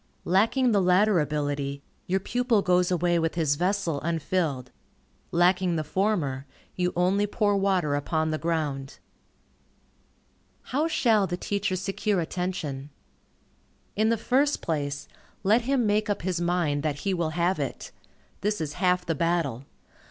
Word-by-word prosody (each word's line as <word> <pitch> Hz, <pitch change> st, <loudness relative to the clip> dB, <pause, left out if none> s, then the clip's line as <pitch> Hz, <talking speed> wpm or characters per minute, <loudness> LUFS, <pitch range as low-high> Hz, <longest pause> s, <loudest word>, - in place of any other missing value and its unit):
Lacking 225 Hz, +7 st, +3 dB
the 205 Hz, -2 st, +3 dB
latter 185 Hz, +2 st, +4 dB
ability, 145 Hz, -2 st, -2 dB, 0.2 s
your 190 Hz, +2 st, +1 dB
pupil 240 Hz, 0 st, +1 dB
goes 180 Hz, -1 st, +3 dB
away 175 Hz, -1 st, +2 dB
with 165 Hz, 0 st, -1 dB
his 160 Hz, -4 st, +2 dB
vessel 175 Hz, -2 st, -1 dB
unfilled. 160 Hz, -5 st, -1 dB, 0.6 s
Lacking 175 Hz, 0 st, +2 dB
the 155 Hz, -, -1 dB
former, 150 Hz, -6 st, -1 dB, 0.3 s
you 180 Hz, -1 st, 0 dB
only 190 Hz, +4 st, +2 dB
pour 205 Hz, -1 st, +1 dB
water 190 Hz, -6 st, +1 dB
upon 155 Hz, +2 st, 0 dB
the 155 Hz, -, -2 dB
ground. 150 Hz, -5 st, -2 dB, 1.7 s
How 295 Hz, +5 st, 0 dB
shall 220 Hz, -10 st, +2 dB
the 175 Hz, -, -3 dB
teacher 200 Hz, 0 st, -1 dB
secure 195 Hz, +1 st, -1 dB
attention? 160 Hz, -5 st, -3 dB, 1.1 s
In 215 Hz, +2 st, +2 dB
the 230 Hz, -, +2 dB
first 275 Hz, +6 st, +1 dB
place, 145 Hz, -3 st, -2 dB, 0.4 s
let 220 Hz, +4 st, +3 dB
him 265 Hz, -4 st, +2 dB
make 210 Hz, 0 st, +1 dB
up 205 Hz, -, -1 dB
his 180 Hz, -1 st, -1 dB
mind 170 Hz, -5 st, 0 dB
that 145 Hz, -1 st, -2 dB
he 195 Hz, -, 0 dB
will 170 Hz, -3 st, 0 dB
have 175 Hz, 0 st, +1 dB
it. 140 Hz, -3 st, -4 dB, 0.5 s
This 210 Hz, +1 st, -1 dB
is 150 Hz, -2 st, -3 dB
half 180 Hz, -1 st, +2 dB
the 165 Hz, -, 0 dB
battle. 160 Hz, -6 st, -1 dB
180 Hz, 145 wpm, -26 LUFS, 155-200 Hz, 1.7 s, latter